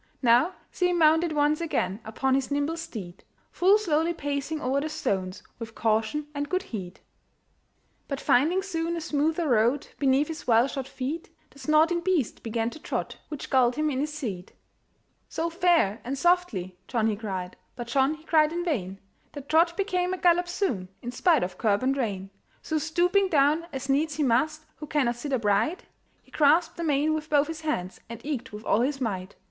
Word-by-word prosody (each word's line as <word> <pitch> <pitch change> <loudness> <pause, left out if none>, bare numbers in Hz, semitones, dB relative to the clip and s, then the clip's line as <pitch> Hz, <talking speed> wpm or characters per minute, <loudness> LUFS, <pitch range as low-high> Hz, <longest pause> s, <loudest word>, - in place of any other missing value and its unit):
Now 245 +9 +4 0.2
see 360 -1 +1
him 355 - +1
mounted 320 +1 +4
once 300 +1 +2
again 200 - -1
Upon 260 +5 -1
his 270 0 +1
nimble 290 +3 0
steed, 205 - -8 0.3
Full 385 +4 +4
slowly 335 -4 0
pacing 290 +1 -3
o'er 275 0 0
the 310 - -3
stones, 190 -10 -2 0.2
With 225 -1 -8
caution 225 +6 0
and 290 0 -3
good 370 +1 0
heed. 190 - -7 1.1
But 275 -2 -3
finding 330 +9 +3
soon 340 -3 -2
a - - -2
smoother 315 +2 0
road 240 +4 +2
Beneath 275 +1 +3
his 320 0 -7
well 230 0 +5
shod 270 -2 -5
feet, 280 +7 -5 0.2
The 280 - -17
snorting 315 +4 +3
beast 340 - 0
began 230 0 -2
to 315 - -11
trot, - - -4
Which 300 -3 -7
galled 250 -3 +4
him 305 +1 0
in 260 - -2
his 300 +2 -1
seat. 215 - -6 0.8
"So, 330 +1 -2
fair 330 - +2
and 270 +3 -3
softly!" 260 - +1
John 230 -3 0
he 220 -1 +1
cried, 190 -4 -5 0.2
But 240 - -5
John 265 +5 +2
he 315 - -18
cried 310 -2 +3
in 345 +1 -3
vain; 195 - -2 0.4
That 285 -2 -9
trot 335 +2 +3
became 370 -2 0
a - - -9
gallop 355 0 +3
soon, 325 - -2
In 240 - -4
spite 320 +6 +3
of 180 0 -5
curb 210 0 +1
and 265 +1 +2
rein. 200 -7 -3 0.3
So 315 -1 -1
stooping 355 +5 +2
down, 305 +1 +3
as 270 -1 -5
needs 290 +2 +1
he 305 - 0
must 305 +5 +1
Who 300 - -8
cannot 260 -5 0
sit 285 +4 -5
upright, 225 - +1 0.4
He - - -25
grasped 310 +3 +3
the 340 - -3
mane 300 0 +2
with 310 0 -4
both 290 -1 +4
his 320 0 -6
hands, 190 - -3
And 230 -1 -7
eke 260 -4 -4
with 210 +1 -9
all 220 - +3
his 270 +2 0
might. 195 -6 -3
290 Hz, 190 wpm, -26 LUFS, 235-325 Hz, 1.1 s, well